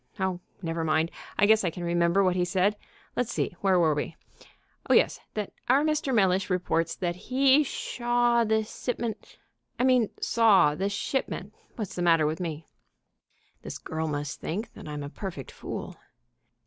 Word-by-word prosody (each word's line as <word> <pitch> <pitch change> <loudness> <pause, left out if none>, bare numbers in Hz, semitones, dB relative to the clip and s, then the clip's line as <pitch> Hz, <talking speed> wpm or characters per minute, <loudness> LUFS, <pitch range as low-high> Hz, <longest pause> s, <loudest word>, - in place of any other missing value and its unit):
Oh, 190 -2 -1 0.2
never 165 0 -2
mind, 160 +1 +1 0.3
I 205 - +5
guess 220 0 +5
I 180 - +1
can 175 +2 -7
remember 170 +2 +2
what 185 -1 +2
he 180 - +2
said.... 190 +3 +2 0.4
Let's 245 - -1
see, - - -2
where 190 -2 +3
were 160 -3 +4
we?... 150 +2 -3 0.7
Oh, - - +6
yes, - - +3 0.2
that 210 -2 -3 0.2
our 270 +4 +5
Mr. 305 -3 0
Mellish 190 -4 +2
reports 170 -2 0
that 175 -1 -2
he 265 +8 +3
shaw 240 -3 +1
the 220 0 +2
sipment 235 0 -5 0.4
I 245 - 0
mean 255 -4 +4
saw 210 -10 +4
the 190 +6 -1
shipment 265 +6 -3 0.2
what's 215 -6 -5
the 175 - -4
matter 165 -3 +4
with 155 +1 -1
me? 160 -3 -4 1.0
(this - - -6
girl 160 0 -4
must 145 -2 -3
think 205 +8 -4
that - - -11
I'm 150 -1 -5
a - - -5
perfect 165 -5 -7
fool) - - -7
190 Hz, 170 wpm, -27 LUFS, 165-230 Hz, 1.0 s, Oh